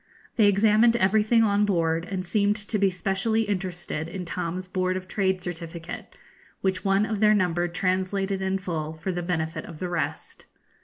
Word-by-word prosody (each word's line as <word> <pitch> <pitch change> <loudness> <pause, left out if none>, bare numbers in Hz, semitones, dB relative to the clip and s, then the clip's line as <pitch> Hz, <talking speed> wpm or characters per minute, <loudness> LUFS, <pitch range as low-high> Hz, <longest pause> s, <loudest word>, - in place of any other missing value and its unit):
They 215 -4 +5
examined 215 +3 +4
everything 220 +2 +3
on 205 -1 +3
board, 165 -4 +1
and 185 -2 -3
seemed 205 +2 +2
to 210 0 -2
be 195 -1 +4
specially 195 +4 0
interested 180 -5 -3
in 180 0 -5
Tom's 180 +2 -4
Board 185 0 0
of 185 0 -7
Trade 190 -3 0
certificate, 170 -1 -7 0.5
which 190 -1 0
one 195 +1 +3
of 215 -1 -2
their 215 0 +5
number 175 -3 +1
translated 190 +2 -1
in 190 0 0
full 160 -5 -4
for 160 +4 -3
the 175 -1 -3
benefit 160 -2 -2
of 165 - -10
the 180 +2 -4
rest. 175 -1 -4
190 Hz, 170 wpm, -26 LUFS, 175-205 Hz, 0.5 s, They